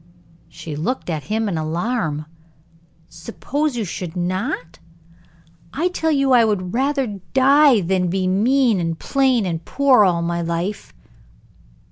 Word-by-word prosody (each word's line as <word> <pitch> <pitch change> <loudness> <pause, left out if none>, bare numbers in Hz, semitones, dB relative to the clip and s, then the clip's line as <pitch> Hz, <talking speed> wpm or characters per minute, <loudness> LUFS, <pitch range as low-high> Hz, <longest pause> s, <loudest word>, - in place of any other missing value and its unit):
She 155 -3 -8
looked 180 - -3
at 150 -4 -4
him 220 +3 -1
in 175 -5 -2
alarm. 160 -1 -2 0.8
"Suppose 245 - -4
you 225 - -2
should 175 -1 -6
not? 175 -2 -3 0.9
I 335 +6 0
tell 325 -3 -1
you 275 -3 +2
I 245 -2 +6
would 185 -5 -1
rather 260 -6 -1
die 275 -2 +5
than 180 +1 0
be 185 +2 -1
mean, 225 +4 +2
and 165 -1 -2
plain, 260 -3 +1
and 165 -2 -3
poor, 270 +1 +3
all 175 -3 +1
my 170 0 -2
life." 170 +4 -4
200 Hz, 135 wpm, -20 LUFS, 170-260 Hz, 0.9 s, I